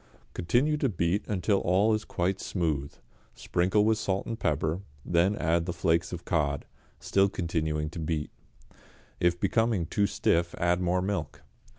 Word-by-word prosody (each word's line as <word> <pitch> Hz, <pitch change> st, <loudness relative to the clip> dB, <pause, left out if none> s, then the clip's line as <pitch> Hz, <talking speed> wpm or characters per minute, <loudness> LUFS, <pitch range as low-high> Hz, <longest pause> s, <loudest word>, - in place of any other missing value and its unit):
Continue 125 Hz, -, +1 dB
to 140 Hz, -3 st, +1 dB
beat 90 Hz, +1 st, 0 dB
until 100 Hz, 0 st, +1 dB
all 100 Hz, +5 st, +3 dB
is 110 Hz, 0 st, -1 dB
quite 95 Hz, +2 st, -1 dB
smooth, 75 Hz, -6 st, -1 dB, 0.4 s
sprinkle 95 Hz, +4 st, +1 dB
with 110 Hz, 0 st, +2 dB
salt 95 Hz, -2 st, -1 dB
and 115 Hz, -1 st, -5 dB
pepper, 80 Hz, +4 st, 0 dB, 0.2 s
then 90 Hz, +4 st, +2 dB
add 85 Hz, -2 st, 0 dB
the 85 Hz, -, -1 dB
flakes 85 Hz, +2 st, +1 dB
of 90 Hz, -1 st, -6 dB
cod, 75 Hz, -4 st, 0 dB, 0.3 s
still 100 Hz, 0 st, +2 dB
continuing 80 Hz, -4 st, -2 dB
to 85 Hz, -, -7 dB
beat. 80 Hz, -1 st, -2 dB, 0.9 s
If 85 Hz, 0 st, +2 dB
becoming 110 Hz, -2 st, +1 dB
too 100 Hz, +5 st, +1 dB
stiff 85 Hz, -4 st, +1 dB
add 85 Hz, 0 st, +1 dB
more 90 Hz, +1 st, +1 dB
milk. 80 Hz, -6 st, -3 dB
90 Hz, 155 wpm, -28 LUFS, 85-100 Hz, 0.9 s, all